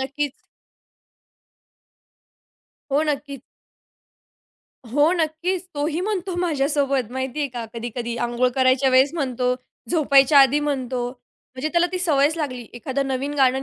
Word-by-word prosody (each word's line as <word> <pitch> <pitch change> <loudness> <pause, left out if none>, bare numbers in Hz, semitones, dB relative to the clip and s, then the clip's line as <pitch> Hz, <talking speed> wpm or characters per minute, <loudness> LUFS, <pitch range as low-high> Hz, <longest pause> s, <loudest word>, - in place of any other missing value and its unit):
नक्कीच. 280 +2 -4 2.5
हो, 290 +2 +3
नक्कीच. 280 -2 -3 1.5
हो, 290 +7 +3
नक्कीच, 345 +2 -1
तोही 300 +3 -1
म्हणतो 380 -2 -2
माझ्यासोबत 280 -6 0
माहिती 260 +2 -4
आहे 285 - 0
का 240 -2 -6
कधी-कधी 235 0 -4
अंघोळ 240 +1 +1
करायच्या 260 0 +3
वेळेस 260 +3 +4
म्हणतो, 255 -5 0 0.4
झोपायच्या 280 -3 +5
आधी 270 +2 +4
म्हणतो, 260 -4 -2 0.5
म्हणजे 260 +4 -2
त्याला 345 0 +3
ती 365 - -1
सवयच 310 -3 +2
लागली. 255 -6 -3
एखादं 265 +3 -2
नवीन 270 +2 -2
गाणं 265 -1 +3
275 Hz, 120 wpm, -22 LUFS, 255-305 Hz, 2.5 s, झोपायच्या